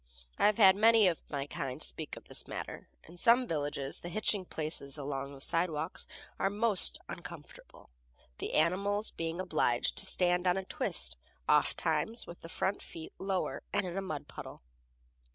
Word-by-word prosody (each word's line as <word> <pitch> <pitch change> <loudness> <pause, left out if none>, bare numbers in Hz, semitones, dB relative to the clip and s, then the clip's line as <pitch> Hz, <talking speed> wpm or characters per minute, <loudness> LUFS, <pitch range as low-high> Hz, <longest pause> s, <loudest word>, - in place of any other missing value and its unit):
I - - +6
have 210 - +2
heard 190 -4 +8
many 220 0 +6
of 170 -3 0
my 140 -2 -2
kind 140 -4 -4
speak - - -2
of - - -11
this - - -4
matter. - - -6
In 170 +2 -14
some 235 +7 +5
villages 145 - -2
the 175 - -7
hitching 205 0 0
places 155 -4 -1
along 140 -1 -4
the - - -12
sidewalks 165 +1 -1 0.3
are 195 - +2
most 210 -1 +4
uncomfortable, - - -11 0.5
the - - -4
animals 200 +6 +2
being 165 +1 -4
obliged 155 -9 +1
to 195 - 0
stand 180 0 +3
on 180 +1 +3
a 190 - -3
twist, - - -1 0.3
ofttimes 230 +2 +2
with 170 - -11
the 165 - -9
front 190 +4 -1
feet 160 -1 -9
lower 190 -1 -1
and 205 - +1
in 180 -1 -5
a 195 - -1
mud 155 -6 -5
puddle. - - -9
175 Hz, 170 wpm, -32 LUFS, 150-195 Hz, 0.5 s, heard